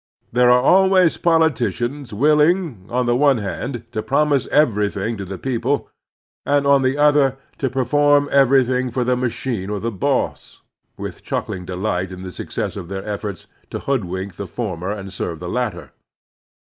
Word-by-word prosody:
There 125 Hz, +1 st, +4 dB
are 125 Hz, 0 st, +5 dB
always 190 Hz, +1 st, +4 dB
politicians 145 Hz, -5 st, 0 dB
willing, 150 Hz, -, +2 dB
on 125 Hz, +1 st, 0 dB
the 120 Hz, 0 st, +2 dB
one 140 Hz, 0 st, +4 dB
hand, 120 Hz, +3 st, -4 dB
to 110 Hz, -, -2 dB
promise 140 Hz, +1 st, +1 dB
everjrthing 105 Hz, -5 st, +1 dB
to 100 Hz, -, -4 dB
the 95 Hz, +1 st, -6 dB
people, 130 Hz, +4 st, -2 dB, 0.5 s
and, 145 Hz, 0 st, +1 dB
on 140 Hz, -1 st, +5 dB
the 130 Hz, +1 st, +1 dB
other, 145 Hz, -3 st, +3 dB, 0.2 s
to 135 Hz, -, 0 dB
perform 145 Hz, +3 st, +3 dB
everything 130 Hz, -2 st, +3 dB
for 125 Hz, +1 st, -1 dB
the 125 Hz, +1 st, +1 dB
machine 120 Hz, -4 st, -3 dB
or 105 Hz, -1 st, -2 dB
the 115 Hz, +3 st, -2 dB
boss, 95 Hz, -, -2 dB, 0.3 s
with -, -, -7 dB
chuckling 95 Hz, -5 st, -4 dB
delight 95 Hz, 0 st, -2 dB
in 95 Hz, 0 st, -8 dB
the 95 Hz, -, -6 dB
success -, -, -4 dB
of 85 Hz, -, -7 dB
their 95 Hz, +1 st, -5 dB
efforts 100 Hz, -3 st, -5 dB, 0.2 s
to -, -, -4 dB
hoodwink 95 Hz, -7 st, -3 dB
the 100 Hz, -, -5 dB
former 95 Hz, -2 st, -4 dB
and 100 Hz, -2 st, -6 dB
serve 85 Hz, -3 st, -4 dB
the 90 Hz, -, -6 dB
latter. 105 Hz, -, -3 dB
125 Hz, 160 wpm, -20 LUFS, 100-140 Hz, 0.5 s, are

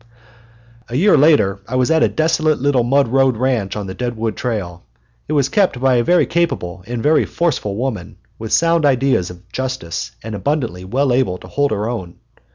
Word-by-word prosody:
A 120 Hz, -, -5 dB
year 190 Hz, +8 st, +4 dB
later 140 Hz, -10 st, +3 dB
I 130 Hz, -, -4 dB
was 130 Hz, +3 st, +2 dB
at 160 Hz, -1 st, +3 dB
a -, -, +5 dB
desolate 155 Hz, -1 st, +1 dB
little 135 Hz, -2 st, +2 dB
mud 135 Hz, +3 st, +2 dB
road 135 Hz, -1 st, +2 dB
ranch 120 Hz, -5 st, -1 dB
on 105 Hz, -1 st, -4 dB
the 95 Hz, -, -6 dB
Deadwood 115 Hz, +1 st, -3 dB
trail. 95 Hz, -8 st, -4 dB, 0.4 s
It 155 Hz, -, -2 dB
was 140 Hz, -3 st, +2 dB
kept 190 Hz, -, +1 dB
by 130 Hz, -1 st, +3 dB
a 120 Hz, -, +2 dB
very 175 Hz, +7 st, +3 dB
capable 95 Hz, -, -2 dB
and 120 Hz, -1 st, -4 dB
very 155 Hz, +1 st, +4 dB
forceful 140 Hz, -12 st, -2 dB
woman, 110 Hz, -6 st, -4 dB, 0.2 s
with 110 Hz, 0 st, -6 dB
sound 165 Hz, -1 st, +3 dB
ideas 135 Hz, -9 st, +2 dB
of 90 Hz, +1 st, -13 dB
justice 130 Hz, -10 st, -4 dB
and 110 Hz, 0 st, -6 dB
abundantly 105 Hz, -, -2 dB
well 130 Hz, +6 st, 0 dB
able 120 Hz, -8 st, +1 dB
to -, -, -13 dB
hold 145 Hz, 0 st, 0 dB
her 105 Hz, 0 st, -2 dB
own. 95 Hz, -8 st, -5 dB
125 Hz, 190 wpm, -18 LUFS, 105-145 Hz, 0.4 s, a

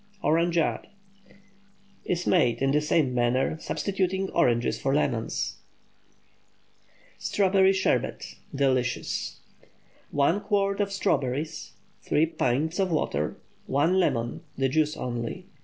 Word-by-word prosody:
ORANGEADE 165 Hz, +2 st, +1 dB, 1.2 s
Is 175 Hz, 0 st, -1 dB
made 120 Hz, -10 st, +3 dB
in 135 Hz, 0 st, +2 dB
the 150 Hz, +2 st, +3 dB
same 150 Hz, -3 st, +1 dB
manner, 125 Hz, +5 st, +1 dB
substituting 190 Hz, +1 st, -1 dB
oranges 120 Hz, -8 st, +1 dB
for 135 Hz, +1 st, +1 dB
lemons. 120 Hz, -6 st, -1 dB, 1.6 s
STRAWBERRY 195 Hz, -1 st, +3 dB
SHERBET. 190 Hz, -1 st, -1 dB, 0.2 s
(Delicious.) 130 Hz, -3 st, -1 dB, 0.2 s
✠ -, -, -23 dB, 0.4 s
1 145 Hz, +8 st, +2 dB
quart 200 Hz, -1 st, 0 dB
of 200 Hz, -1 st, -1 dB
strawberries. 150 Hz, -7 st, -1 dB, 0.3 s
3 155 Hz, -, +2 dB
pints 160 Hz, +2 st, -1 dB
of 190 Hz, -1 st, +2 dB
water. 75 Hz, -, -1 dB, 0.3 s
1 160 Hz, +8 st, +2 dB
lemon—the 130 Hz, -2 st, -1 dB
juice 155 Hz, +2 st, +1 dB
only. 120 Hz, -2 st, -4 dB
150 Hz, 105 wpm, -27 LUFS, 130-185 Hz, 1.6 s, made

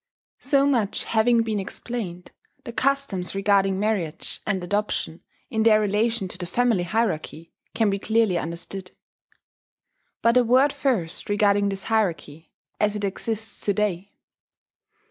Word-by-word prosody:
So 275 Hz, +1 st, +2 dB
much 235 Hz, -8 st, +1 dB
having 230 Hz, +1 st, +3 dB
been 220 Hz, -2 st, -2 dB
explained, 190 Hz, -3 st, -5 dB, 0.3 s
the 235 Hz, -, -7 dB
customs 250 Hz, -11 st, 0 dB
regarding 195 Hz, -1 st, +2 dB
marriage 200 Hz, -7 st, -2 dB
and 190 Hz, -3 st, -1 dB
adoption, 205 Hz, -3 st, -2 dB, 0.3 s
in 220 Hz, -3 st, 0 dB
their 220 Hz, -1 st, +5 dB
relation 215 Hz, 0 st, 0 dB
to 180 Hz, -, -4 dB
the 175 Hz, -, -4 dB
family 235 Hz, 0 st, +2 dB
hierarchy, 175 Hz, -4 st, -2 dB, 0.2 s
can 220 Hz, -3 st, +2 dB
be 195 Hz, -, -1 dB
clearly 220 Hz, -2 st, +2 dB
understood. 175 Hz, +3 st, -6 dB, 1.3 s
But 235 Hz, +1 st, +4 dB
a 250 Hz, -, +6 dB
word 260 Hz, +4 st, +4 dB
first 205 Hz, -, -1 dB
regarding 205 Hz, -1 st, +3 dB
this 195 Hz, -1 st, -4 dB
hierarchy, 170 Hz, -8 st, -2 dB, 0.3 s
as 210 Hz, 0 st, +1 dB
it 205 Hz, -, -4 dB
exists 220 Hz, +2 st, -4 dB
to 205 Hz, -, +1 dB
day. 200 Hz, -1 st, -1 dB
205 Hz, 135 wpm, -24 LUFS, 190-230 Hz, 1.3 s, a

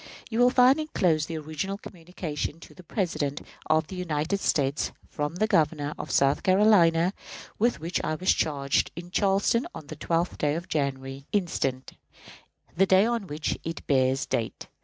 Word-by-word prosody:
You 225 Hz, -, -1 dB
will 245 Hz, 0 st, +6 dB
find 255 Hz, +3 st, +5 dB
inclosed 175 Hz, -, +1 dB
the 165 Hz, -, -4 dB
original 155 Hz, +6 st, -4 dB
communication 165 Hz, -5 st, -6 dB
to -, -, -13 dB
the 185 Hz, -, -13 dB
President 155 Hz, -7 st, -2 dB, 0.3 s
of 155 Hz, 0 st, +3 dB
the 190 Hz, -, -9 dB
United 175 Hz, +1 st, -1 dB
States 140 Hz, -5 st, 0 dB, 0.2 s
from 150 Hz, +2 st, -3 dB
the 215 Hz, -, +1 dB
Governor 150 Hz, -6 st, +1 dB
of -, -, -5 dB
South 135 Hz, 0 st, +3 dB
Carolina, 185 Hz, -3 st, +4 dB, 0.5 s
with 235 Hz, -2 st, +2 dB
which 165 Hz, +3 st, -2 dB
I 155 Hz, -, -1 dB
was 185 Hz, +4 st, +2 dB
charged 140 Hz, -3 st, 0 dB
in 175 Hz, +1 st, -8 dB
Charleston 200 Hz, +5 st, +2 dB
on 160 Hz, -2 st, -8 dB
the 155 Hz, -, -8 dB
12th 165 Hz, +3 st, -1 dB
day 145 Hz, 0 st, +1 dB
of 170 Hz, +2 st, -5 dB
January, 135 Hz, -2 st, -3 dB
instant, 135 Hz, -9 st, -1 dB, 0.8 s
the 195 Hz, +2 st, +3 dB
day 190 Hz, +2 st, +5 dB
on 230 Hz, -4 st, -1 dB
which 150 Hz, 0 st, -3 dB
it 165 Hz, +1 st, -6 dB
bears 130 Hz, -1 st, +2 dB
date. 115 Hz, -, -3 dB
165 Hz, 165 wpm, -27 LUFS, 150-195 Hz, 0.8 s, will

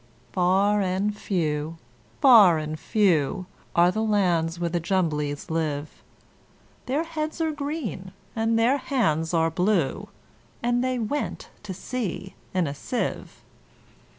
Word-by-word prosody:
Far 195 Hz, +3 st, +3 dB
and 195 Hz, +2 st, 0 dB
few, 160 Hz, -5 st, -2 dB, 0.4 s
far 215 Hz, -, +8 dB
and 155 Hz, 0 st, -4 dB
few, 185 Hz, -3 st, +1 dB, 0.3 s
Are 175 Hz, +1 st, +5 dB
the 215 Hz, -, -2 dB
lands 175 Hz, -6 st, +1 dB
where 175 Hz, -, 0 dB
the 175 Hz, -, 0 dB
Jumblies 155 Hz, -5 st, -1 dB
live: 155 Hz, -2 st, -3 dB, 0.9 s
Their 280 Hz, +5 st, 0 dB
heads 315 Hz, -1 st, -4 dB
are 320 Hz, -1 st, +1 dB
green, 285 Hz, -, -4 dB, 0.2 s
and 225 Hz, 0 st, +1 dB
their 240 Hz, +5 st, +3 dB
hands 165 Hz, -, 0 dB
are 165 Hz, -1 st, +2 dB
blue 185 Hz, +2 st, 0 dB, 0.5 s
And 240 Hz, +1 st, +1 dB
they 255 Hz, 0 st, 0 dB
went 245 Hz, +6 st, -3 dB
to 205 Hz, -3 st, -6 dB
sea 195 Hz, -3 st, -4 dB, 0.2 s
in 185 Hz, -2 st, +1 dB
a 140 Hz, -, -3 dB
sieve. 245 Hz, -, -4 dB
190 Hz, 125 wpm, -25 LUFS, 165-230 Hz, 0.9 s, far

